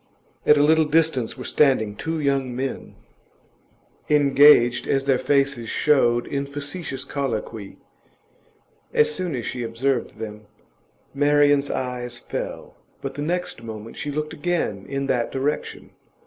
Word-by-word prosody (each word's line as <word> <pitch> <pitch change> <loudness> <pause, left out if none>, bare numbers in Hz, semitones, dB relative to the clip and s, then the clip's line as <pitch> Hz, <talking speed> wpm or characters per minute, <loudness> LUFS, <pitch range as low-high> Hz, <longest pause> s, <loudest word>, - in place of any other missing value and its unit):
At 150 - +7
a 145 - +4
little 160 +1 +4
distance 150 -6 +1
were - - -7
standing 120 -8 +2
two 160 +7 -3
young 135 -3 0
men, 135 +1 -4 1.1
engaged, 140 -4 +5
as 135 -1 +1
their 135 -2 +2
faces 140 -4 +1
showed, 120 -5 +2
in 140 0 -3
facetious 145 0 -5
colloquy; 115 -6 -4 1.2
as 150 0 +4
soon 180 -3 -3
as 120 - -4
she 125 - -4
observed 120 +1 -2
them, 105 -1 -8 0.7
Marian's 145 0 +3
eyes 125 -1 -3
fell, - - -6 0.2
but 135 0 -5
the 145 - -6
next 175 -5 -3
moment 110 -1 -8
she 145 - -5
looked 150 +2 -3
again 155 - -2
in 140 0 -2
that 120 -3 0
direction. 140 +3 -3
140 Hz, 135 wpm, -23 LUFS, 120-150 Hz, 1.2 s, At